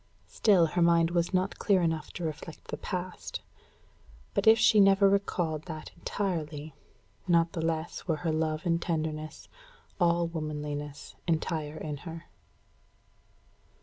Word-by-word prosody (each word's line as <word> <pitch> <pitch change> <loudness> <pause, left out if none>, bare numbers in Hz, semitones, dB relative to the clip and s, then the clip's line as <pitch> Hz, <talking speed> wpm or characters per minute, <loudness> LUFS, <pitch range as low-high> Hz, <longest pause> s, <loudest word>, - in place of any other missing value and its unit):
Still 195 -6 +4
her 175 +2 -1
mind 170 0 +4
was 170 0 +1
not 185 +1 0
clear 190 -4 +3
enough 160 -2 -1
to 175 - -6
reflect 160 0 -6
the - - -3
past. 180 -1 -5 0.9
But - - 0
if 220 +1 +9
she 220 -1 +5
never 195 0 +6
recalled 175 -6 0
that 155 -3 -7
entirely, 160 -5 -3 0.5
not 170 -1 +4
the 165 - -3
less 165 +1 -2
were 160 - +2
her 165 - +2
love 155 +1 -1
and 170 -1 +1
tenderness 155 -2 -3 0.5
all 170 0 +3
womanliness 150 -3 -5
entire 155 -2 -1
in 150 -2 -4
her. 165 +2 -8
165 Hz, 135 wpm, -29 LUFS, 155-180 Hz, 0.9 s, if